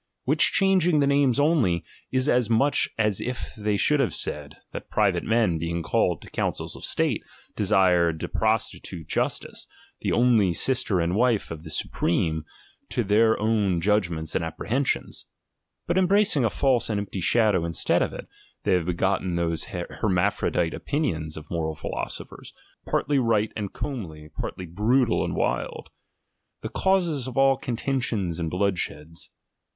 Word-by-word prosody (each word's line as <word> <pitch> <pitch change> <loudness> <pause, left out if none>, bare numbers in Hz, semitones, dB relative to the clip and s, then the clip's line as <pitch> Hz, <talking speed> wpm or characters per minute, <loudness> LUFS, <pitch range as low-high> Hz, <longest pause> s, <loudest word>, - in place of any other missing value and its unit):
Which - - +4
changing 185 -5 +3
the 140 - +3
names 140 -2 +3
only, 145 - +2 0.3
is 130 +1 +1
as 125 -5 +2
much 135 +6 +2
as 105 -3 +1
if 125 0 -5
they 105 -2 -1
should 150 +7 +3
have 135 - +1
said, 75 -1 -4 0.2
that - - -8
private - - +1
men 110 -8 +1
being 85 +1 -2
called - - 0
to - - -12
councils - - -3
of - - -11
state, - - +1 0.3
desired 85 -4 +3
to - - -2
prostitute 80 -4 -2
jttstice, - - -2 0.3
the - - -2
only 115 -7 +3
sister 120 -6 +2
and 85 +2 0
wife 115 -4 +1
of 80 -1 -7
the 80 - -9
supreme, 80 0 -1 0.4
to 120 - 0
their 110 +2 +3
own 105 -5 +1
judgments 85 -5 0
and - - 0
apprehensions; 115 - -2 0.6
but 175 +2 +1
em 185 - +3
bracing 195 -8 +3
a 115 - +3
false 130 0 +1
and 105 -2 0
empty 100 -2 -5
shadow 105 -2 +3
instead 85 -1 +1
of - - 0
it, - - -8 0.4
they - - +2
have 90 -2 +1
begotten 95 0 0
those 85 -2 -1
hermaphrodite 90 -2 -1
opinions 85 - -2
of 75 -1 -10
moral 80 -2 -2
philosophers, - - -6 0.3
partly 145 -1 +1
right 110 -3 +1
and 105 -3 -4
comely, 80 - -6
partly 90 +3 -6
brutal 110 +8 +1
and - - -3
wild; - - -2 0.7
the - - -4
causes 175 -9 +1
of 130 - -7
all 135 0 +5
contentions 120 -8 -2
and 80 -2 -2
bloodsheds. 85 -4 -2
105 Hz, 155 wpm, -25 LUFS, 85-130 Hz, 0.7 s, all